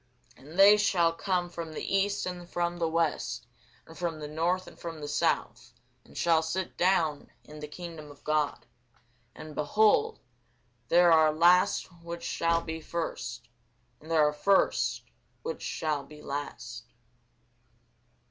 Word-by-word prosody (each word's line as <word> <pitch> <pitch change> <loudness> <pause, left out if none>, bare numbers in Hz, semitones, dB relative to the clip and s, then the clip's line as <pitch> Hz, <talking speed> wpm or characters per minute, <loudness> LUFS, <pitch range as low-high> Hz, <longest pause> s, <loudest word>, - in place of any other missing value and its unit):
And 150 +6 -13
they 200 +2 +8
shall 175 -5 +2
come 180 0 -1
from 165 -2 -7
the 190 - -2
east, 200 +1 +1
and 175 -1 -6
from 175 0 -1
the 170 -1 0
west, 165 -1 -1 0.4
and 160 - -14
from 170 -2 -3
the 150 - -6
north, 170 +5 0
and - - -14
from 165 -2 -6
the 145 - -6
south, 145 - -1 0.3
and - - -15
shall 165 -2 +3
sit 175 +3 -3
down 170 -5 +1
in 150 0 -12
the 150 - -6
kingdom 160 -1 -9
of 145 -1 -15
God. 150 -7 0 0.7
And, 155 -1 -9
behold, 215 - +2 0.7
there 175 0 +5
are 160 -1 +5
last 175 +4 +4 0.2
which 170 0 -7
shall 165 0 +1
be 160 -1 -6
first, 155 -8 -5 0.5
and 155 - -15
there 155 -2 +4
are 150 - 0
first 195 +6 +2 0.4
which 475 +1 -5
shall 150 -3 -2
be 150 +2 -14
last. 140 -4 -6
165 Hz, 150 wpm, -29 LUFS, 150-175 Hz, 0.7 s, they